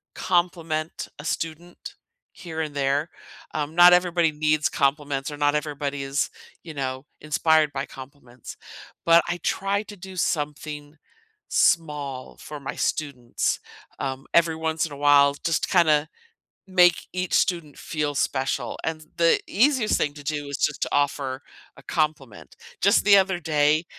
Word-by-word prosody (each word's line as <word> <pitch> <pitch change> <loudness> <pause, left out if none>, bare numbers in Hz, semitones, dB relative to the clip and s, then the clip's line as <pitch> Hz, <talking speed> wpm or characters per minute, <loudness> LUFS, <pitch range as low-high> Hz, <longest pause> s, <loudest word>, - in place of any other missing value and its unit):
compliment 170 -3 -1
a 145 - -9
student 165 +2 -5 0.4
here 160 -3 -6
and 155 -2 -4
there, 140 +3 0 0.4
um, 150 +1 -3
not 175 +1 +8
everybody 175 -2 +3
needs 150 0 +1
compliments 140 0 -1
or 145 - -7
not 145 0 +2
everybody 145 -1 -3
is, 135 +2 -1 0.3
you 165 - -9
know, 130 -1 -4 0.2
inspired 155 0 +2
by 135 0 -3
compliments, 130 -3 -12 0.5
but 170 0 +7
I 175 0 -1
try 200 +1 0
to 210 -1 -11
do 190 +1 -10
something 150 -2 -3 0.5
small 145 -6 0
for 150 -1 -8
my - - -6
students, 130 -6 -2 0.4
um, 135 0 -4
every 165 -1 +4
once 160 0 -1
in 160 - -8
a - - -8
while 140 0 +5
just 165 -3 0
to - - -1
kinda 155 -4 +3 0.6
make 180 -2 +4
each 185 0 -3
student 170 -6 0
feel 150 -2 -3
special, 135 -2 -1
and, 155 -1 -4
the 170 -1 +4
easiest 250 0 +2
thing 145 - -1
to 145 - -11
do 145 0 -3
is 140 - -4
just 150 - -1
to - - 0
offer 140 -2 -1 0.3
a - - -15
compliment. 150 - -3 0.3
Just 200 +2 +4
the 200 -1 +8
other 190 -2 +2
day, 150 0 +2
150 Hz, 150 wpm, -24 LUFS, 145-170 Hz, 0.6 s, not